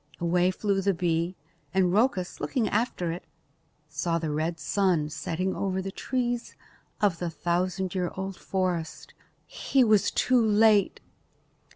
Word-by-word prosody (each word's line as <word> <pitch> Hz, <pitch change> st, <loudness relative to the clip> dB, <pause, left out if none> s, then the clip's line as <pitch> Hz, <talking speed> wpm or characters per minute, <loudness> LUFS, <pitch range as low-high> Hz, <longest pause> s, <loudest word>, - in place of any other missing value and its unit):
Away 175 Hz, +1 st, +2 dB
flew 195 Hz, +1 st, 0 dB
the 195 Hz, -1 st, +1 dB
bee 170 Hz, +1 st, 0 dB, 0.4 s
and 185 Hz, -2 st, +3 dB
Rhoecus, 200 Hz, -4 st, +1 dB
looking 245 Hz, -6 st, 0 dB
after 210 Hz, -6 st, -1 dB
it, 170 Hz, -, -6 dB, 0.6 s
saw 165 Hz, +3 st, -1 dB
the 160 Hz, -2 st, -2 dB
red 160 Hz, +2 st, -2 dB
sun 175 Hz, -2 st, +1 dB
setting 185 Hz, +5 st, -2 dB
over 190 Hz, -1 st, -1 dB
the 195 Hz, +1 st, -4 dB
trees 245 Hz, +1 st, -2 dB, 0.4 s
of 200 Hz, -6 st, +1 dB
the 175 Hz, -, -2 dB
thousand 180 Hz, +2 st, -1 dB
year 180 Hz, -2 st, -1 dB
old 190 Hz, 0 st, -4 dB
forest. 180 Hz, -4 st, -3 dB, 0.3 s
He 270 Hz, -2 st, +1 dB
was 215 Hz, -4 st, +4 dB
too 250 Hz, -2 st, +2 dB
late! 215 Hz, -2 st, +4 dB
185 Hz, 140 wpm, -27 LUFS, 170-205 Hz, 0.6 s, was